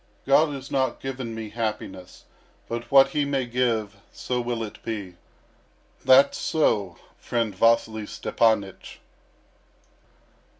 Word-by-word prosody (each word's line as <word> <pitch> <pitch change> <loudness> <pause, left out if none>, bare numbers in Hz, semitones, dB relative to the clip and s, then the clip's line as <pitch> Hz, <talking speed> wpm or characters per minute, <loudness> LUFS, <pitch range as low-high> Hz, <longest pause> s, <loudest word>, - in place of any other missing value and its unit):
God 145 +3 +4
has 135 0 -9
not 130 -2 0
given 130 -4 -5
me 110 -1 -6
happiness, 105 -5 -5 0.4
but 115 0 -5
what 135 0 +6
He 145 +1 0
may 140 -2 -1
give, 115 -4 -1
so 125 -1 -3
will 120 -1 -3
it 105 - -9
be. 105 -5 -5 0.9
That's 135 +2 +5
so, 100 - 0 0.2
friend 115 -4 -2
Vasily 110 0 +2
Stepanych." 105 -4 -1
115 Hz, 115 wpm, -25 LUFS, 110-130 Hz, 0.9 s, what